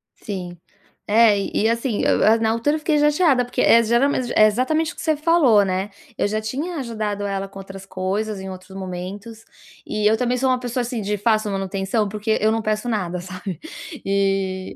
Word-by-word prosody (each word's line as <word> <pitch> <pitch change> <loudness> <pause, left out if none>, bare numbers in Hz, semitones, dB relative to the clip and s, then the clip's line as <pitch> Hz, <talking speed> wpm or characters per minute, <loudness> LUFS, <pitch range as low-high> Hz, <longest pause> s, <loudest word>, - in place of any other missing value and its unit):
Sim, 180 -4 -6 0.5
eh, 215 0 +5 0.2
e - - +1
e - - +4
assim, 230 -1 -1
e - - 0
eu 225 +2 +4
na 220 - +2
altura 230 +7 +1
eu - - -3
fiquei 305 0 +1
chateada, 295 -3 +3
porque, 245 - -2
é 230 - +6
geralmen 240 +5 +2
é 215 - +7
exatamente 310 +9 0
o - - -25
que - - -8
você 315 -1 +1
falou, 295 -9 +4
né, 190 +1 -2 0.3
eu - - +1
já 215 +1 -2
tinha 285 +11 -4
ajudado 215 -6 -3
ela 195 -1 -3
com 195 0 -11
outras 195 0 -10
coisas 195 +3 -3
em 190 0 -7
outros 185 +1 -10
momentos, 195 +4 -7 0.4
e 210 0 -2
eu 220 - +2
também 250 +1 0
sou 260 +1 +1
uma 255 -1 +2
pessoa, 245 0 -2
assim, 240 -1 -3
de 205 +1 -2
fácil 215 0 +1
manutenção, 195 +2 -1
porque 215 +2 -1
eu 215 +1 +3
não 225 0 0
peço 215 +2 -2
nada, 180 -5 -2
sabe, 185 0 -7 0.5
e, 195 -1 -1
215 Hz, 205 wpm, -21 LUFS, 195-245 Hz, 0.5 s, é